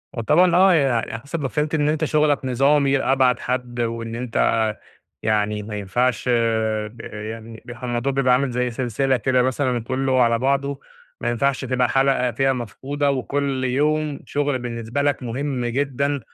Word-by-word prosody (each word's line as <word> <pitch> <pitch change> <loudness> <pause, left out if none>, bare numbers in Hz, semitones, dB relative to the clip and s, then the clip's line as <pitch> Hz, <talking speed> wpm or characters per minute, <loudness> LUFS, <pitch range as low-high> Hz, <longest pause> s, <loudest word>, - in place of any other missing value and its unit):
هو 115 - -2
طبعًا 170 +9 +4
آه 190 +1 +6
يع 140 -6 +3
على 115 0 -2
حسب 140 +6 -5
ما 135 - -1
فهمت 150 +4 -1
إن 150 -1 +1
أنت 155 0 0
شغلك 150 -2 +2
نظامي 140 +2 +3
لأبعد 130 -2 +2
حد، 125 -1 -3
وإن 115 0 -3
أنت 120 -1 -6 0.9
يعني 105 -1 0
ما 105 0 -6
ينفعش 110 +4 0
آآ 110 -2 0
يعني، 110 +1 -8
ب - - -12
الموضوع 120 +2 -1
بيبقى 135 -2 +2
عامل 130 +1 +1
زي 125 0 -1
سلسلة 130 +2 0
كده 125 +2 +2
مثلًا 130 -1 0
كله 130 +1 +1
على 115 -1 +2
بعضه، 140 +2 0 0.4
ما - - 0
ينفعش 130 +3 0
تبقى 125 -1 +1
حلقة 135 -2 +2
فيها 135 +3 +1
مفقودة، 135 +4 -2
وكل 135 0 -1
يوم 150 +3 0
شغل 145 -2 -1
بالنسبة 120 +2 -3
لك 140 -2 0
مهم 125 +1 -3
جدًا، 140 +3 -1
130 Hz, 165 wpm, -22 LUFS, 120-140 Hz, 0.9 s, آه